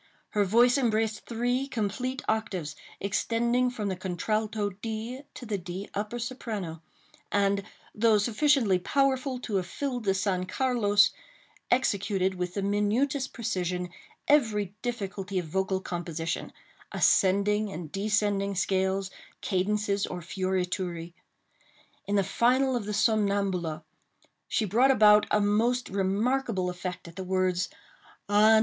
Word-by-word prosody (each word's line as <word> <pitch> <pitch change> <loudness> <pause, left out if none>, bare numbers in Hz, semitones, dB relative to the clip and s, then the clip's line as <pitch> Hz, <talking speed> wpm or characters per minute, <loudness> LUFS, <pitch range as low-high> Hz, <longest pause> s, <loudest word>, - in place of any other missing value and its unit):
Her 210 - +2
voice 240 +7 +4
embraced 220 -3 0
three 245 +3 0
complete 250 +2 -2
octaves, 185 -8 -2 0.2
extending 235 +5 +1
from 220 -4 -4
the 190 - -1
contralto 205 +3 -1
D 225 +5 -5
to 245 - -8
the 210 -3 -2
D 180 +3 -6
upper 210 +4 -3
soprano, 220 -9 -5 0.5
and, 200 0 +2 0.3
though 220 0 +4
sufficiently 230 -2 +3
powerful 265 +4 +1
to 210 -5 -1
have 180 -2 -2
filled 250 0 -3
the 195 -1 +2
San 185 -2 0
Carlos, 215 -4 +3 0.6
executed, 200 -6 +1
with 180 -1 -4
the 200 - -1
minutest 235 +7 +1
precision, 180 -6 -2 0.4
every 215 -9 +2
difficulty 195 -5 -3
of 180 - -1
vocal 190 +3 -1
composition—ascending 190 +4 0
and 165 -4 -7
descending 200 -1 0
scales, 190 0 0 0.3
cadences, 200 +1 0
or 180 - -5
fiorituri. 180 -1 -2 0.9
In 200 - 0
the 200 - +4
final 255 +6 +2
of 235 -4 -2
the 210 - -3
Somnambula, 200 -7 +1 0.6
she 220 - 0
brought 235 +7 +4
about 210 -4 +6
a 210 - +3
most 225 +5 +1
remarkable 200 +1 0
effect 180 0 -6
at 165 - -12
the 190 - -3
words: 185 -1 0 0.6
Ah! 215 +2 +6
205 Hz, 125 wpm, -28 LUFS, 190-230 Hz, 0.9 s, about